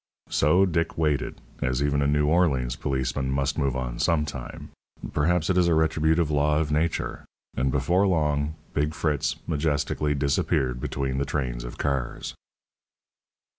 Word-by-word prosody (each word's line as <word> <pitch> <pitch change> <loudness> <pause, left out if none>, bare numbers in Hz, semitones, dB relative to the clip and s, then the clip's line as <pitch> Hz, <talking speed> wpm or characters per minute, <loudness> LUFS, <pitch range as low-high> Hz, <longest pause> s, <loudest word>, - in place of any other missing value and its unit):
So 85 +7 +4
Dick 85 -2 -1
waited, 75 -4 0 0.2
as 65 +2 0
even 70 0 +1
a 70 - +2
New 75 +1 +2
Orleans 75 -7 +2
policeman 65 0 -2
must 70 +2 0
move 70 -3 0
on 60 -2 -3
some 80 -2 +2
time 65 -5 -8 0.4
perhaps 80 +2 +2
it 90 - +3
is 90 - +3
a 85 - +3
retributive 80 0 +2
law 75 +1 +2
of 75 -1 0
nature 80 +2 -1 0.3
and 65 +1 +1
before 85 +9 +2
long 75 -3 +1 0.2
"Big 75 +2 0
Fritz" 75 -4 0
majestically 75 -1 0
disappeared 65 -3 0
between 65 -1 -2
the 70 - 0
trains 65 -4 -2
of - - -8
cars. 70 -4 -2
75 Hz, 150 wpm, -26 LUFS, 65-80 Hz, 0.4 s, So